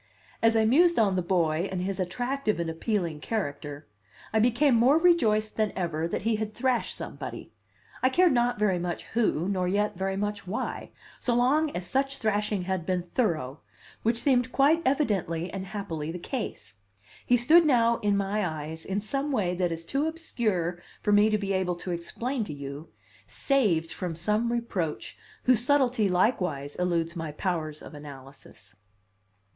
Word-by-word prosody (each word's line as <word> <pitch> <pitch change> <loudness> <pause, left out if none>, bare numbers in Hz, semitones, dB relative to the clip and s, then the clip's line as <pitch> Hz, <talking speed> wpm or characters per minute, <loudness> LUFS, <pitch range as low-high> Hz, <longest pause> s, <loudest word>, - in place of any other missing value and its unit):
As 225 0 +4
I 220 -1 +4
mused 340 +9 +4
on 205 -4 +3
the 185 - +1
boy 170 -1 +1
and 185 -1 -2
his 195 +1 -3
attractive 245 +4 -1
and 165 -1 -1
appealing 170 -2 -2
character, 150 -7 -4 0.5
I 220 - +3
became 245 +5 +3
more 245 +6 +5
rejoiced 225 -12 +3
than 215 -1 +1
ever 165 -3 -1
that 170 - -3
he 225 0 +1
had 215 0 -4
thrashed 250 -1 0
somebody, - - -7 0.5
I 260 - +4
cared 355 +5 +4
not 245 -1 +2
very 200 -4 +2
much 175 0 -3
who 210 -7 +1
nor 185 -2 0
yet 205 +2 0
very 190 0 -1
much 205 -1 -3
why, 205 +4 -4 0.3
so 240 - 0
long 285 +6 +3
as 180 - -5
such 270 +8 0
thrashing 210 -2 0
had 185 -1 -2
been 180 0 -2
thorough, 155 - 0 0.4
which 230 +1 0
seemed 250 -3 +2
quite 295 +5 +4
evidently 195 - 0
and 190 -1 -5
happily 165 -7 -4
the 175 - -5
case. 240 +8 -5 0.5
He 245 - +3
stood 310 +9 +6
now 235 -6 +3
in 205 -1 +1
my 200 +2 0
eyes, 160 -1 -4
in 195 +2 -2
some 275 +7 -2
way 205 -10 0
that 180 -1 0
is 165 0 -5
too 275 - 0
obscure 215 - -2 0.2
for 210 - +2
me 205 +1 +5
to 215 - +2
be 200 -1 -2
able 185 -2 0
to 180 +1 -6
explain 230 +9 -3
to 155 - -6
you, 140 +2 -7 0.4
saved 200 - +1
from 180 -3 -4
some 210 +7 0
reproach 200 -10 -3 0.3
whose 250 -2 +4
subtlety 250 -6 +3
likewise 180 - 0
eludes 170 -1 0
my 160 -2 -4
powers 155 -2 -3
of - - -11
analysis. 135 -7 -12
200 Hz, 170 wpm, -27 LUFS, 170-240 Hz, 0.5 s, stood